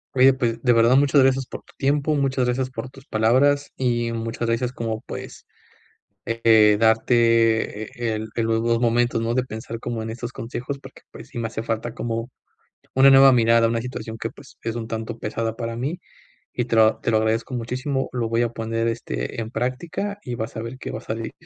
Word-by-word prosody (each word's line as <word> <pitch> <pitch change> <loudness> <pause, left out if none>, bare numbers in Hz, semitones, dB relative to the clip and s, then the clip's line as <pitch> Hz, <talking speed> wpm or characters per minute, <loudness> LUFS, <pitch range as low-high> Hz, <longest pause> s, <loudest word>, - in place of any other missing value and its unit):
Oye, 130 +1 +7
pues, 120 -3 -1
de 125 -2 +4
verdad, 115 +2 +5
muchas 140 0 +5
gracias 135 0 +2
por - - -8
tu - - -22
tiempo, 145 +2 +1
muchas 135 -3 +1
gracias 130 +1 -1
por 130 0 -6
tus 135 0 -16
palabras, 130 +6 +2
y 120 -2 0
muchas 115 +1 -3
gracias 120 +2 0
como, 115 -3 -4
pues, - - -8 0.8
eh, 110 -2 +4
darte, 115 -1 +3
eh, 115 0 -3
el 110 0 -6
el 115 -1 0
los 115 0 +1
2 115 0 +2
momentos, 120 0 +2
¿no?, 115 +1 -1
de 130 0 +1
pensar 115 -1 -7
como 115 -2 -4
en 110 - -4
estos 120 +1 -6
consejos. 125 +4 -5
Porque, - - -14
pues, - - -12
sí - - -6
me 115 - -1
hace 110 0 -5
falta 115 0 -3
como 115 +1 -3 0.6
una 135 +1 +7
nueva 135 0 +8
mirada, 115 -1 +4
una 115 0 0
situación 115 -3 -6
que, 115 - -3
pues, 140 0 -16
es 115 0 -3
un 115 -1 -4
tanto 115 +1 -4
pesada 115 +1 -3
para 115 -1 -4
mí, 145 +9 -3 0.5
y 120 - -1
te 115 - -1
lo 110 0 +5
te - - -2
lo 110 - +4
agradezco 110 +3 -1
muchísimo, 130 +3 -2
lo 120 -2 -1
voy 115 +1 +1
a 120 - 0
poner, 115 0 -2
este, 60 - -4
en 110 - -6
práctica 155 - -3
y 125 -1 -4
vas 110 0 -5
a - - -3
ver 115 +3 -7
que - - -6
va - - -4
a - - -14
salir. 115 0 -5
115 Hz, 215 wpm, -23 LUFS, 115-130 Hz, 0.8 s, nueva